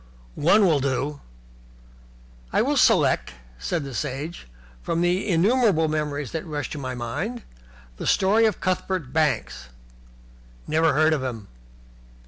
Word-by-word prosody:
"One 200 +7 +4
will 160 -5 +3
do." 140 +2 -2 1.3
"I - - +2
will - - 0
select," 60 - +3 0.3
said 165 - -2
the 135 -1 -7
Sage, 145 - -5 0.3
"from 165 - -1
the 180 +4 +1
innumerable 190 -1 +3
memories 150 -2 -2
that 160 -1 -4
rush 150 -4 -5
to 150 - -5
my 130 -2 -4
mind, 195 - -4 0.5
the - - -5
story 215 +4 +4
of 210 - -2
Cuthbert 185 -6 -2
Banks." 65 - -1 1.0
"Never 160 0 +2
heard 155 +3 +3
of 150 - -1
him." 115 -6 -5
155 Hz, 130 wpm, -24 LUFS, 135-180 Hz, 1.3 s, One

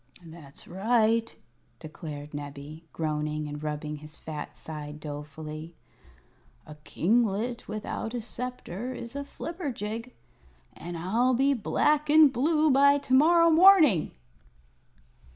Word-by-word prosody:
"That's 160 -4 -13
right," 225 +4 +1 0.4
declared 150 -2 -9
Nebbie, 145 +2 -8
groaning 150 -1 -2
and 145 0 -7
rubbing 150 0 -4
his 155 +1 -11
fat 155 -2 -7
side 150 -1 -8
dolefully. 155 +2 -8 0.9
"A 150 - -10
kinglet 225 +6 0
without 215 +2 -5
a 240 - -3
sceptre 245 -1 -6
is 235 +2 -8
a 280 - -3
flibberjig, 250 - -6 0.6
and 175 +1 -7
I'll 230 +9 +1
be 275 +3 +3
black 295 +5 +1
and 300 -2 +7
blue 305 +4 +2
by 280 +1 +5
to 275 -2 -4
morrow 335 +5 +5
morning!" 320 - +6
215 Hz, 115 wpm, -27 LUFS, -, 0.9 s, and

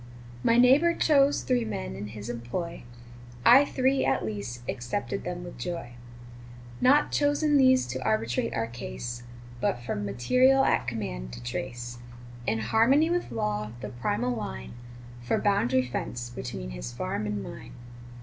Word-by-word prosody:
My 230 - +4
neighbor 275 +8 +6
chose 285 -2 +3
three 250 -2 +1
men 65 - -4
in 105 - -6
his 105 0 -8
employ, 120 +7 -5 0.6
I 265 +4 +8
three, 265 0 +1
at 135 - +1
least, 110 +3 -5
accepted 130 +11 -3
them 175 0 -4
with 175 -7 -9
joy; 170 -2 -4 0.9
Not 285 +4 +5
chosen 290 +1 +2
these 260 -2 +5
to 130 +1 -5
arbitrate 115 +1 0
our 115 - 0
case, 120 - -6 0.4
But 120 - 0
from 105 -3 -3
material 255 - +3
at 125 - +2
command 60 - -4
to - - -8
trace, 120 - -5 0.5
In 110 - +1
harmony 260 - +3
with 350 0 -1
law, 105 -1 -2
the - - -5
primal 205 - -1
line 65 - -6 0.5
For 120 - 0
boundary 130 -11 +2
fence, 120 -1 -4
between 60 - -6
his - - -6
farm 105 - -3
and 105 -1 -3
mine. 115 +1 -9
120 Hz, 150 wpm, -28 LUFS, -, 0.9 s, I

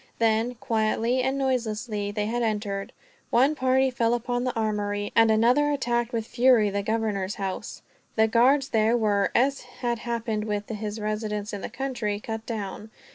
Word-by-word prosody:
Then, 225 +2 +1
quietly 230 0 0
and 265 +2 0
noiselessly, 225 -5 -1
they 210 0 -2
had 240 +3 -1
entered. 205 -3 -2 0.4
One 265 +5 +4
party 260 -1 +2
fell 235 -1 +1
upon 245 +1 -2
the 255 - -2
armory, 205 -2 -1
and 225 -1 +6
another 245 +7 +4
attacked 240 -4 0
with 230 -3 -2
fury 240 -4 +4
the 200 0 -1
governor's 210 -2 -1
house. 195 -2 -5 0.3
The 220 0 +4
guards 260 +5 +3
there 220 +2 +3
were, 205 -3 +2
as 275 +3 +2
had 245 -2 -4
happened 230 -2 -2
with 210 -1 -3
his 215 -1 -4
residence 210 -1 -3
in 200 - -4
the - - -5
country, 240 -5 -3
cut 220 +1 -6
down. 215 -1 -5
225 Hz, 165 wpm, -26 LUFS, 210-245 Hz, 0.4 s, and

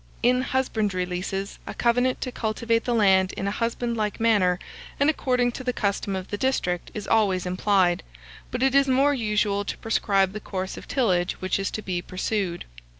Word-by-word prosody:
In 250 +1 +4
husbandry 215 -8 0
leases, 185 +2 -4
a - - -6
covenant 245 +2 +1
to 255 - -3
cultivate 230 0 -1
the 245 - 0
land 190 -3 +4
in - - -4
a - - 0
husbandlike 230 -1 -2
manner, 205 -6 +3 0.4
and 285 +3 +4
according 250 -4 +1
to 260 - -7
the 250 -1 -1
custom 200 -2 -1
of 185 0 -5
the 205 - -4
district, 180 -10 0
is 210 -2 -5
always 190 -5 +2
implied; 185 -1 +2 0.5
but 250 +1 -2
it 265 0 +3
is 275 0 +5
more 270 +2 +4
usual 210 -4 0
to - - -5
prescribe 195 -3 +1
the 215 - -4
course 190 -2 -4
of - - -10
tillage 185 -9 +1
which 185 +1 -2
is 195 - -1
to 215 - -5
be 180 -2 -2
pursued. 185 -1 -2
210 Hz, 185 wpm, -25 LUFS, 190-245 Hz, 0.5 s, is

